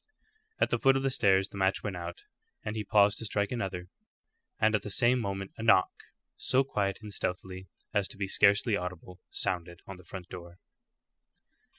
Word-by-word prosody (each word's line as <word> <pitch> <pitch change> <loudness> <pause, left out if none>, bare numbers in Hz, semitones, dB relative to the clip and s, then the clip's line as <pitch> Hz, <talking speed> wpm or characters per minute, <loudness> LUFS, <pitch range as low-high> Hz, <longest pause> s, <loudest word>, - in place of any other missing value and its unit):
At - - +2
the - - +1
foot 135 -1 +4
of 135 - -2
the 135 - +1
stairs 95 -5 +3
the - - -10
match 95 0 +1
went 100 -3 -3
out, 85 0 -7 0.4
and 105 - -3
he 110 - -2
paused 105 0 +3
to 115 - -6
strike 105 -1 -1
another; 95 -7 -3 0.7
and 110 0 +3
at 110 - +2
the 105 - -6
same 120 +5 +3
moment 95 -3 -4
a - - -6
knock, 115 -5 +4 0.5
so 130 +1 +2
quiet 100 -7 -1
and 105 -1 -7
stealthy 95 +1 -4 0.3
as 100 -3 +2
to - - -7
be 100 - -1
scarcely 100 +3 +4
audible, 90 -1 -6
sounded 85 -1 -3
on 95 - -9
the 90 - -15
front 90 +1 -9
door. 85 -1 -10
100 Hz, 190 wpm, -30 LUFS, 90-105 Hz, 0.7 s, foot